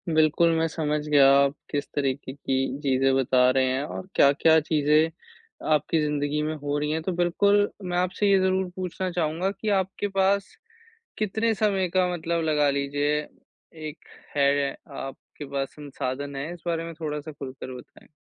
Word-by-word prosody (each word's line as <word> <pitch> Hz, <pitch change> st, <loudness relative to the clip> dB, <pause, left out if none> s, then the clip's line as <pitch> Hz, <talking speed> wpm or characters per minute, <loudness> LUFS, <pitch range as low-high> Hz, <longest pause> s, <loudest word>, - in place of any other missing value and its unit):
बिल्कुल, 155 Hz, +2 st, +4 dB
मैं 165 Hz, 0 st, +2 dB
समझ 150 Hz, -2 st, -1 dB
गया, 140 Hz, -2 st, +6 dB
आप 140 Hz, 0 st, +3 dB, 0.2 s
किस 145 Hz, -1 st, -2 dB
तरीके 135 Hz, -1 st, -2 dB
की 135 Hz, -1 st, -1 dB, 0.2 s
चीज़ें 135 Hz, -1 st, +2 dB
बता 130 Hz, -1 st, +4 dB
रहे 130 Hz, 0 st, +2 dB
हैं 130 Hz, +2 st, -1 dB
और 185 Hz, -, -6 dB
क्या-क्या 160 Hz, +3 st, +5 dB
चीज़ें 155 Hz, +1 st, +2 dB, 0.6 s
आपकी 155 Hz, +2 st, +2 dB
ज़िंदगी 150 Hz, 0 st, -1 dB
में 155 Hz, +1 st, -1 dB
हो 145 Hz, -1 st, -2 dB
रही 150 Hz, +1 st, -1 dB
हैं। 160 Hz, +1 st, -1 dB
तो 185 Hz, -, -1 dB
बिल्कुल, 200 Hz, +4 st, +3 dB
मैं 175 Hz, -1 st, -2 dB
आपसे 185 Hz, +3 st, +1 dB
ये 195 Hz, -, +5 dB
ज़रूर 190 Hz, 0 st, +1 dB
पूछना 185 Hz, 0 st, -3 dB
चाहूँगा 170 Hz, +2 st, -1 dB
कि 215 Hz, +1 st, -4 dB
आपके 190 Hz, +2 st, -3 dB
पास, 195 Hz, 0 st, +1 dB, 0.6 s
कितने 220 Hz, +2 st, 0 dB
समय 195 Hz, -3 st, +1 dB
का 185 Hz, -1 st, +4 dB
मतलब 170 Hz, 0 st, -1 dB
लगा 150 Hz, -2 st, +2 dB
लीजिए, 145 Hz, +1 st, 0 dB, 0.5 s
एक 155 Hz, -1 st, -9 dB, 0.3 s
है, 140 Hz, -1 st, +2 dB, 0.2 s
आपके 135 Hz, +2 st, -8 dB
पास 135 Hz, -1 st, -2 dB
संसाधन 140 Hz, -1 st, -5 dB
है? 145 Hz, +5 st, -4 dB
इस 175 Hz, -3 st, -13 dB
बारे 165 Hz, -1 st, -1 dB
में 165 Hz, -, -7 dB
थोड़ा-सा 150 Hz, 0 st, -4 dB
खुलकर 130 Hz, -2 st, -8 dB
बताएँ। -, -, -16 dB
150 Hz, 165 wpm, -25 LUFS, 140-175 Hz, 0.6 s, गया